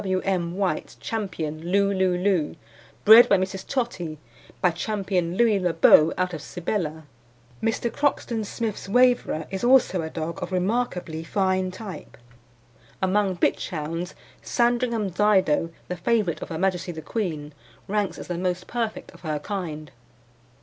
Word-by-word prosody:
W. 185 -1 0
M. 180 -2 -1
White's 195 -2 -1
Ch. - - -8
Loo 185 -1 -1
Loo 185 -2 +2
Loo, 180 -5 +1 0.5
bred 225 +3 +9
by 200 - +6
Mrs. 190 +1 -3
Tottie, 185 - -2 0.4
by 180 - +3
Ch. 165 - -5
Louis 200 +1 +1
Le 180 -2 0
Beau 165 -1 +6
out 185 -1 0
of 160 - -5
Sibella. 165 -3 -3 0.6
Mr. 225 +1 -1
Croxton 245 -6 0
Smith's 215 -2 -4
Waverer 245 -9 +3
is 190 +2 -4
also 245 -7 +4
a 160 - -4
dog 160 +1 -5
of 175 - -4
remarkably 180 -4 -1
fine 185 +1 0
type. 185 -3 -9 0.8
Among 190 0 +1
bitch - - 0
hounds 165 +2 -4 0.3
Sandringham 235 -4 +1
Dido, 185 -5 +3 0.2
the 180 - -4
favourite 210 -2 0
of - - -6
Her 165 - -4
Majesty 180 0 0
the 160 -2 -8
Queen, 155 -7 -3 0.3
ranks 205 -1 -1
as - - -7
the 175 -1 -4
most 180 0 -1
perfect 230 -2 -3
of - - -17
her 155 -3 -2
kind. 155 -3 -5
185 Hz, 150 wpm, -25 LUFS, 170-210 Hz, 0.8 s, bred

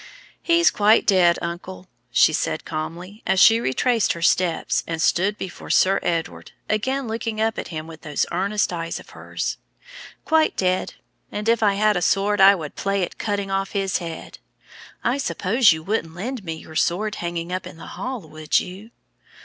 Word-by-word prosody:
"He's 340 0 +4
quite 215 +1 +4
dead, 180 -4 +4
uncle," 180 +2 -6 0.2
she 155 - +5
said 155 - -2
calmly, 170 +7 -6
as 190 - +2
she 225 +3 +7
retraced 230 - +1
her 170 - -8
steps 170 -1 +1
and 165 -1 -3
stood 195 +5 +2
before 185 - -8
Sir 195 +1 +4
Edward, 165 -1 -3
again 260 +5 -1
looking 225 -1 -3
up 220 0 0
at - - -5
him 155 -2 -6
with 160 -1 -11
those 150 -3 -1
earnest 195 +1 0
eyes 165 -1 -4
of - - -15
hers, - - -4 0.7
"quite 320 -1 +2
dead; 185 0 0 0.4
and 210 +1 -4
if 230 0 +3
I 205 -2 +3
had 210 +1 +3
a 180 - 0
sword 200 +2 +2
I 195 +1 +8
would 155 -5 -7
play 195 -1 -1
at - - -14
cutting 200 -2 -2
off 195 0 -1
his 195 -2 0
head. 165 -2 -8 0.6
I 250 +4 +1
suppose 230 -3 +3
you 160 0 -2
wouldn't 165 -4 -2
lend 235 +5 -5
me 165 -3 -4
your 160 0 -12
sword 200 +6 0
hanging 170 0 -4
up 185 - -3
in - - -11
the - - -10
hall, 255 -2 -5
would 155 -2 0
you?" 195 +5 -9
195 Hz, 180 wpm, -22 LUFS, 170-215 Hz, 0.7 s, I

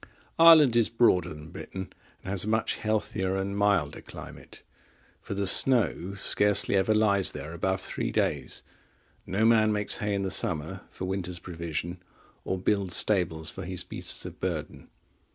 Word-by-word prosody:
(31) 165 - +6
Ireland 150 -7 +7
is 115 - +3
broader 105 -7 +2
than 75 0 -11
Britain 95 0 -8 0.3
and 95 - -6
has 100 -3 +1
a - - -3
much 110 0 0
healthier 105 -3 -2
and 95 +1 -3
milder 100 -8 0
climate; - - -12 0.6
for - - -6
the 100 0 -2
snow 100 -4 +3
scarcely 105 0 +3
ever 100 +3 +2
lies 100 -3 +2
there 80 - -8
above 95 +3 -2
three - - -4
days: - - -2 0.6
no 100 +4 0
man 110 -1 +4
makes 105 -1 +1
hay 105 -2 -2
in 100 - -2
the 95 - -3
summer 80 +3 -1
for 95 - -7
winter's 90 -2 -4
provision, 85 0 -6 0.4
or 95 - -3
builds 95 -1 0
stables 85 -6 +1
for - - -8
his 90 0 -3
beasts - - -3
of - - -9
burden. - - -5
95 Hz, 165 wpm, -27 LUFS, 90-105 Hz, 0.6 s, Ireland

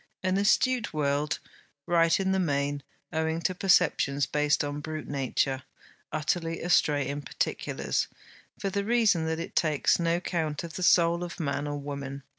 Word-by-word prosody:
An 185 +1 +1
astute 230 0 +2
world; 145 0 0 0.5
right 165 0 +3
in 190 0 +1
the 190 - +2
main, 145 -4 0 0.3
owing 160 +1 0
to 185 - 0
perceptions 165 -7 +3
based 150 +2 +1
upon 145 0 -3
brute 155 +1 -6
nature; 135 -1 -1 0.5
utterly 165 +2 -1
astray 150 -5 +2
in 145 +1 -3
particulars, - - -2 0.5
for 195 - -3
the 200 +1 -1
reason 210 -7 +2
that 160 0 -1
it 165 - -6
takes 155 -1 +2
no 170 0 +1
count 160 -4 -2
of 165 -2 -7
the 185 - -5
soul 170 -1 +4
of 175 0 -7
man 145 -2 -2
or 145 0 -3
woman. 140 -1 -6
160 Hz, 160 wpm, -28 LUFS, 145-175 Hz, 0.5 s, soul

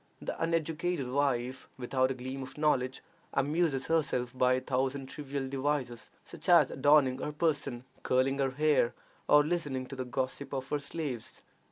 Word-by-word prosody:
The - - -4
uneducated 165 -2 0
wife, 130 -2 0
without 130 +1 +1
a 135 - -2
gleam 130 +2 -5
of 130 +2 -9
knowledge, 135 -4 +1 0.3
amuses 145 -1 +1
herself 135 -6 0
by 125 0 +4
a 130 - +2
thousand 135 +1 -1
trivial 140 -1 -5
devices, 135 -3 -2 0.2
such - - -7
as 170 -6 +6
adorning 135 -2 +4
her 150 - -3
person, 145 -6 -1 0.2
curling 135 +2 +1
her 135 -1 +2
hair, 145 -2 +2 0.3
or 150 0 +7
listening 145 -5 -1
to 135 - -8
the 130 -1 -4
gossip 130 +2 -3
of 135 0 -3
her 150 - 0
slaves. 140 -5 -5
135 Hz, 160 wpm, -31 LUFS, 130-150 Hz, 0.3 s, or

